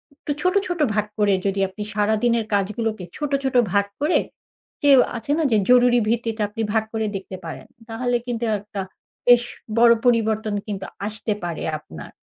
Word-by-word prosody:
একটু 290 - -6
ছোট, 365 0 +2
ছোট 350 -2 -3
ভাগ 210 -1 +1
করে 205 -1 +3
যদি 195 0 0
আপনি 210 +2 -7
সারাদিনের 220 +2 +1
কাজগুলোকে 210 +1 -1
ছোট, 295 -1 -3
ছোট 265 -1 -1 0.2
ভাগ 200 0 +3 0.2
করে, 305 +4 +3 0.6
যে 290 - +5 0.3
আছে 230 +6 -4
না 325 - +1
যে 220 - +4
জরুরি 245 -1 +6
ভিত্তিতে 225 -1 -1
আপনি 225 +2 -5
ভাগ 220 - +2
করে 220 -1 -1
দেখতে 190 -1 -6
পারেন। 160 - -8 0.2
তাহলে 245 +2 -1
কিন্তু 240 -1 -2 0.2
একটা 205 -1 -6 0.5
বেশ 245 0 +7 0.4
বড় 235 0 +7
পরিবর্তন 220 -3 +2
কিন্তু 195 -2 -4 0.2
আসতে 215 0 -2
পারে 170 -2 -4 0.2
আপনার। 80 - -11
220 Hz, 165 wpm, -22 LUFS, 205-245 Hz, 0.6 s, বেশ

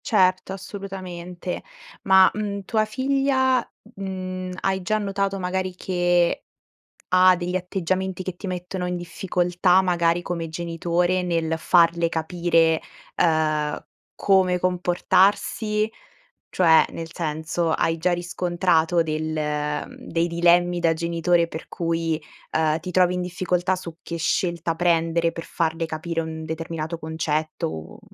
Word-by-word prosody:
Certo, 185 -5 +2
assolutamente. 185 -2 -6 0.4
Ma, 190 -1 +7
mhmm, 205 -1 -3
tua 215 0 +1
figlia, 260 +1 +1 0.3
mhmm, 185 -1 -5
hai 190 0 0
già 215 +4 0
notato, 195 -1 -1
magari, 185 0 -2
che 175 -1 +1 0.7
ha 185 0 +6
degli 175 +1 -3
atteggiamenti 185 0 -2
che 185 -1 -5
ti 190 - -9
mettono 180 0 -4
in 180 0 -2
difficoltà, 180 +1 +1
magari 175 -2 +1
come 170 -2 -4
genitore, 170 +2 -1
nel 165 -2 0
farle 170 0 +3
capire, 165 -1 +2 0.4
ehm, 155 -2 +1 0.3
come 185 -2 +3
comportarsi? 200 +4 +1 0.6
Cioè, 165 -3 +5
nel 165 0 -7
senso, 160 +1 -2
hai 165 0 +1
già 180 +3 +1
riscontrato 175 -1 +1
del 155 0 -2 0.7
dei 165 +1 -1
dilemmi 175 +1 +3
da 165 -1 +3
genitore 170 +1 +1
per 160 -1 -8
cui, 165 -1 -1 0.3
ehm, 155 0 +1
ti 180 +3 -6
trovi 180 -1 +3
in 180 - -1
difficoltà 180 0 0
su 170 -3 -8
che 170 - -5
scelta 170 0 0
prendere 165 -1 +2
per 165 - -7
farle 165 0 -1
capire 165 +1 -3
un 160 0 -6
determinato 160 0 -4
concetto 155 -1 -2
o 80 0 -8
175 Hz, 125 wpm, -23 LUFS, 165-185 Hz, 0.7 s, Ma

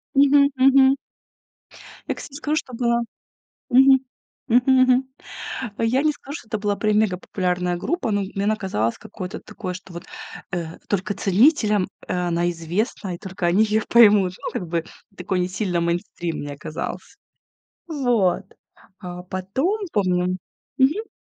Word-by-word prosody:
Мгм 280 0 +6
мгм. 270 +1 +6 1.1
Я, - - -1
кстати, - - -10
скажу, 300 0 -1
что 255 - -4
было 235 0 +1 0.7
Мгм 265 +1 +7 0.5
мгм 255 +2 +4
мгм. 255 +1 +4 0.7
Я 235 +4 +2
не 310 - +3
скажу, 285 0 -10
что 225 - -16
это 215 - -2
была 205 0 0
прям 215 -1 +2
мегапопулярная 180 -3 0
группа, 320 - -2
но 205 0 +1
м 195 - -4
мне 195 - -1
она 215 0 +2
казалось 115 - -1
какое-то 185 +2 -7
такое, 185 -5 -6
что 180 0 -11
вот, 170 - -8 0.5
э, 170 -2 -4
только 205 +1 -1
ценителям, 210 - +3 0.2
э, - - -1 0.2
она 170 0 +1
известна 175 +4 -3
и 170 - -8
только 190 -3 -4
они 185 +5 +4
ее 215 0 +1
поймут. 205 -5 +6
Ну - - -3
как 180 - -4
бы 165 -1 -1 0.3
такой, 185 0 -2
не 180 - +1
сильно 185 -2 -1
мейнстрим 170 0 -2
мне 145 -1 -6
казался. 155 +1 -6 0.7
Вот, 245 - +1 0.6
а 180 -2 -7
потом, 200 - -1
помню 180 -2 +1 0.4
Мгм. 310 +12 +2
205 Hz, 150 wpm, -22 LUFS, 180-255 Hz, 1.1 s, Мгм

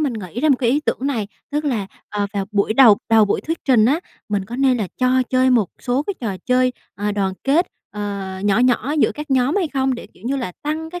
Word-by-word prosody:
mình 285 -5 0
nghĩ 210 0 -6
ra 310 - +2
một 275 - +5
cái 240 -2 +2
ý 290 - +2
tưởng - - -1
này, 235 -8 -1 0.2
tức 295 +1 -1
là, 230 -9 -1 0.2
ờ, 205 -1 -1
vào 200 -1 -1
buổi 205 +1 +1
đầu 230 -6 +7
đầu 220 -1 +6
buổi 200 - 0
thuyết 325 +1 -3
trình 240 -6 +4
á, 290 +8 +2 0.3
mình 205 -2 -1
có 235 +5 -7
nên 265 -1 +3
là 210 -5 -2
cho 255 0 +3
chơi 260 0 +3
một 230 -7 +3
số 255 +2 0
cái 400 +6 -4
trò 205 -5 -3
chơi, 255 0 +3 0.2
ờ, 205 +2 -2
đoàn 195 -2 0
kết, 310 +7 +3 0.2
ờ, 200 -2 -5
nhỏ 205 +2 +3
nhỏ 250 +3 +2
giữa - - +3
các 300 -1 -7
nhóm 265 +5 +2
hay 365 -5 +1
không, 265 -2 0
để, 245 - -8
kiểu - - -21
như 275 +2 0
là, 235 -9 -4
tăng 315 +2 -3
cái 355 +1 -6
250 Hz, 255 wpm, -20 LUFS, 210-275 Hz, 0.3 s, đầu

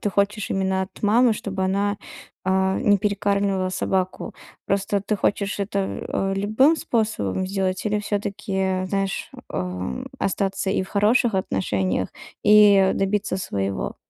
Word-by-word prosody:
ты 205 - -1
хочешь 200 +2 0
именно 190 0 0
от 190 - -10
мамы, 230 +3 +4
чтобы 195 -3 -3
она, 200 +2 0 0.5
а, 190 0 +2
не 205 -5 +3
перекармливала 200 -1 0
собаку? 185 0 -2 0.3
Просто 200 +1 0
ты 210 +2 -1
хочешь 200 0 0
это, 200 0 -2 0.3
э, 195 0 -1
любым 215 +11 +3
способом 215 - -1
сделать 190 -1 -1
или 210 -1 +1
всё-таки, 195 -2 -2
знаешь, 195 0 -2 0.2
ам, 90 -7 -4
остаться 195 0 -1
и 190 - +1
в 190 - -9
хороших 220 +2 +2
отношениях, 95 - -1 0.4
и 205 -2 +6
добиться 195 -1 0
своего? 100 - -3
195 Hz, 130 wpm, -23 LUFS, 190-205 Hz, 0.5 s, и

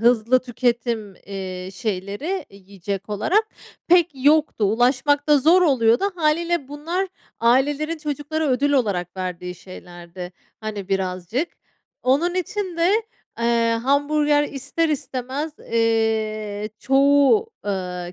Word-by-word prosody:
hızlı 240 +1 +4
tüketim, 235 -4 -1
eee, 185 -2 -6
şeyleri 210 - -3
yiyecek 195 0 -7
olarak 355 - +2 0.4
pek 350 -1 +5
yoktu. 300 -6 +3
Ulaşmak 255 +7 +2
da 295 -1 +6
zor 330 +7 +5
oluyordu. 245 - +3
Hâliyle 335 -2 0
bunlar 335 +7 -3 0.3
ailelerin 290 +7 +2
çocuklara 300 +1 -2
ödül 280 +3 +2
olarak 200 -10 0
verdiği 180 -1 -4
şeylerdi, 175 0 -10 0.3
hani, 210 -3 -5
birazcık. 190 - -1 0.5
Onun 300 +8 +2
için 370 0 -3
de, 335 +2 +3 0.5
eee, 230 -1 +2
hamburger 290 +2 +2
ister 290 +4 -2
istemez, 280 0 -3
eee, 220 -2 0
çoğu, 285 - +4 0.2
ııı, 180 -3 -3
250 Hz, 105 wpm, -22 LUFS, 205-300 Hz, 0.5 s, da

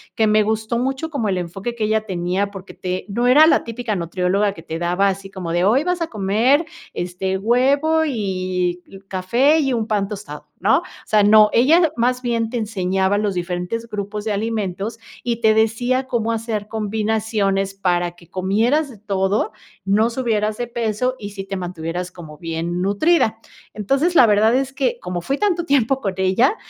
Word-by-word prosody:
que 220 - +2
me 215 0 +4
gustó 220 +2 -1
mucho, 265 +5 -2
como 265 -9 -2
el 190 - 0
enfoque 195 +7 -4
que 220 -2 -1
ella 215 0 0
tenía, 185 +1 -1
porque 195 -1 -10
te 185 0 -4
no 240 +5 0
era 295 +5 +7
la - - +4
típica 230 -1 -3
nutrióloga 185 +3 0
que 165 - -12
te 165 0 -5
daba 180 +3 +1
así 195 0 -5
como 185 -3 -6
de: 175 +1 +1
"Hoy 245 +8 +3
vas 360 0 -1
a 330 - 0
comer, 225 - +2 0.3
este, 180 +2 -2
huevo 275 +9 +2
y 190 -9 -2 0.3
y 195 - -13
café 235 +12 +2
y 270 -4 +1
un 225 -2 -1
pan 205 -3 0
tostado", 210 +1 -8
¿no? - - +4
O - - -10 0.2
sea, 210 -1 +3
no, 210 +1 +7
ella 315 +7 +4
más 250 +2 +1
bien 230 -2 -1
te 245 - -3
enseñaba 190 -2 0
los 205 -1 0
diferentes 180 +6 -3
grupos 210 -1 -5
de 220 - -1
alimentos 210 0 -3 0.2
y 235 -1 -2
te 220 -1 +5
decía 245 +4 +1
cómo 230 -3 -1
hacer 220 -2 -3
combinaciones 215 -2 -1
para 175 -3 0
que 170 -1 -20
comieras 225 +11 +1
de 240 - -12
todo, 195 0 0 0.3
no 210 +4 +3
subieras 220 -4 -1
de 240 - -3
peso 235 +1 -1
y 205 - -6
sí 195 -1 -6
te 195 - -5
mantuvieras 175 0 -4
como 160 -4 -11
bien 165 +2 -3
nutrida. 220 - +2 0.3
Entonces, 275 - 0
la 250 - +8
verdad 215 +3 +4
es 270 0 -1
que 255 -3 -1
como 180 -3 -4
fui 275 +10 -2
tanto 355 -3 0
tiempo 270 -2 +2
con 195 -3 -2
ella, 190 - +2
215 Hz, 185 wpm, -20 LUFS, 190-240 Hz, 0.3 s, la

